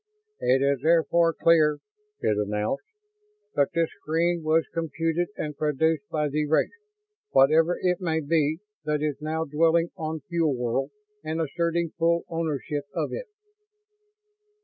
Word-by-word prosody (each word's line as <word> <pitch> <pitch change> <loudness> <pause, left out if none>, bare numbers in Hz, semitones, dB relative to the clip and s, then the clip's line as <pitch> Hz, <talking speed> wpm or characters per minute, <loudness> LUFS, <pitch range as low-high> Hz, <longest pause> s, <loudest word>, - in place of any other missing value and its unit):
"It 130 +2 +2
is 140 -1 +2
therefore 165 +1 +3
clear," 155 -2 +4 0.4
it 105 - +2
announced, 105 - -2 0.7
"that 140 - +3
this 165 -1 +2
screen 170 +2 0
was 160 +1 +2
computed 165 +2 -1
and 150 -1 -4
produced 150 0 0
by 150 -1 0
the 150 +1 -1
race, 155 - +2 0.6
whatever 160 +6 +4
it 180 +1 0
may 160 -3 0
be, 155 +1 +1 0.2
that 150 -1 -1
is 150 -2 -2
now 160 +1 -2
dwelling 165 +3 +2
on 160 -2 -4
Fuel 160 -1 0
World 125 +3 -1 0.3
and 155 +1 -3
asserting 170 +1 -1
full 170 +1 +2
ownership 150 -3 -2
of - - -2
it." - - -5
160 Hz, 135 wpm, -26 LUFS, 145-165 Hz, 0.7 s, clear